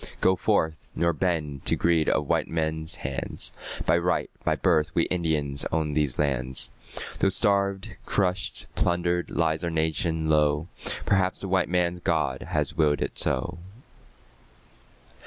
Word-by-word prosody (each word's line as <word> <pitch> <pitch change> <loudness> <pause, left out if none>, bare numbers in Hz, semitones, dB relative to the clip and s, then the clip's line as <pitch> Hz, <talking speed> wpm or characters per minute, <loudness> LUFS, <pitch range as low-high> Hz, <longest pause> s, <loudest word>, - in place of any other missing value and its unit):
Go 95 - +4
forth, 80 -5 0
nor 85 0 +2
bend 75 -4 -2
to - - +5
greed 85 -2 +2
of - - +1
white - - +1
men's 80 +1 -1
hands, 70 -5 -3 0.3
By - - +4
right, - - 0
by - - +2
birth 80 -2 +1
we 85 - +4
Indians 80 -5 0
own 80 -2 0
these 75 -4 0
lands, 65 -3 0 0.5
Though 95 - +4
starved, 100 -1 +1
crushed, 90 -2 -1
plundered, 85 0 0
lies 80 -1 0
our 85 - 0
nation 80 0 0
low... 75 +1 +2 0.4
Perhaps 95 -2 +1
the 100 - -4
white 95 -2 +1
man's 90 0 +1
God - - 0
has - - -1
willed 75 -3 +2
it - - +1
so. 85 0 +1
80 Hz, 140 wpm, -26 LUFS, 75-90 Hz, 0.5 s, to